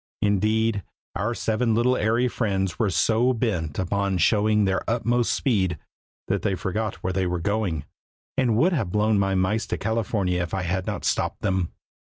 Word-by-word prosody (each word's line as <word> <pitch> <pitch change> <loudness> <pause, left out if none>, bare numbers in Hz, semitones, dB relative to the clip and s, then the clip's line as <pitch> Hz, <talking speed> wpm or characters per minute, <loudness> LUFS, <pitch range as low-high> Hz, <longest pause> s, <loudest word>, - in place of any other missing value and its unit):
Indeed, 105 +1 +2 0.3
our 110 +5 -1
seven 110 +1 0
little 125 +3 +3
airy 115 +2 +2
friends 95 -7 -1
were 110 - +2
so 115 +6 +2
bent 90 - -2
upon 100 +1 0
showing 105 +2 +3
their 95 -1 +1
utmost 120 +1 +1
speed 95 - +1 0.5
that - - 0
they 100 - 0
forgot 105 +3 -2
where 95 - -1
they 95 0 0
were 90 0 -1
going, 90 -5 -1 0.5
and 125 -5 +2
would 175 +9 +3
have 115 - -1
blown 105 0 +2
my 95 -1 +1
mice 95 +4 0
to - - -2
California 100 -4 0
if 85 +2 -3
I 95 - -2
had 95 +1 -2
not - - -3
stopped - - 0
them. 95 -4 0
105 Hz, 175 wpm, -24 LUFS, 95-115 Hz, 0.5 s, little